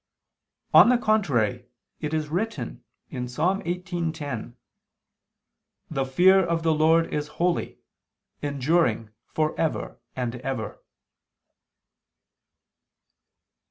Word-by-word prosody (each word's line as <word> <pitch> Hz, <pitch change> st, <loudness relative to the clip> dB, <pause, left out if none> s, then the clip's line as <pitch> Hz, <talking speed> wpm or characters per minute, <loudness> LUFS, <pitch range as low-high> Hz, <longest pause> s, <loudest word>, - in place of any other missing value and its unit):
On -, -, +9 dB
the 250 Hz, -, +5 dB
contrary, 130 Hz, -, +1 dB, 0.3 s
It 150 Hz, -2 st, -3 dB
is 155 Hz, -1 st, -1 dB
written 210 Hz, +8 st, -3 dB, 0.3 s
(Ps. 125 Hz, -2 st, -5 dB
18:10): 170 Hz, -, -2 dB, 1.4 s
"The 135 Hz, -3 st, 0 dB
fear 185 Hz, +8 st, +5 dB
of 170 Hz, -1 st, -1 dB
the 160 Hz, -1 st, +3 dB
Lord 160 Hz, +2 st, +3 dB
is 150 Hz, 0 st, -1 dB
holy, 175 Hz, 0 st, 0 dB, 0.6 s
enduring 140 Hz, -6 st, +1 dB, 0.2 s
for 155 Hz, 0 st, -1 dB
ever 160 Hz, -5 st, -2 dB, 0.2 s
and 125 Hz, -1 st, -3 dB
ever." 125 Hz, -3 st, -5 dB
155 Hz, 90 wpm, -25 LUFS, 130-175 Hz, 1.4 s, On